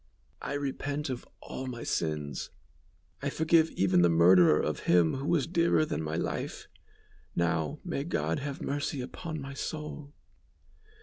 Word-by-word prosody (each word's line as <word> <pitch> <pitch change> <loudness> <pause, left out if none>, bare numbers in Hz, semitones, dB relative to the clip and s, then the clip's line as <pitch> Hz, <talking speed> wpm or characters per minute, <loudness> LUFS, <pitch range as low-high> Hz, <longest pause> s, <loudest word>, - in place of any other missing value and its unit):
"I - - -3
repent 145 0 -2
of 125 - -6
all 130 - -6
my 120 -2 -5
sins; 75 -4 -2 0.7
I - - -1
forgive 160 0 +3
even 95 -2 +3
the 85 - +5
murderer 85 -1 +6
of - - -1
him 85 -3 +5
who 140 +2 -4
was 165 -6 +2
dearer 170 -2 +3
than 80 - -2
my 80 0 -3
life. - - -3 0.7
Now, 85 - 0
may 165 -6 -2
God 155 -1 -1
have 140 -1 -5
mercy 145 0 -2
upon 155 +5 -5
my 135 0 -6
soul." 150 0 -5
135 Hz, 145 wpm, -30 LUFS, -, 0.7 s, murderer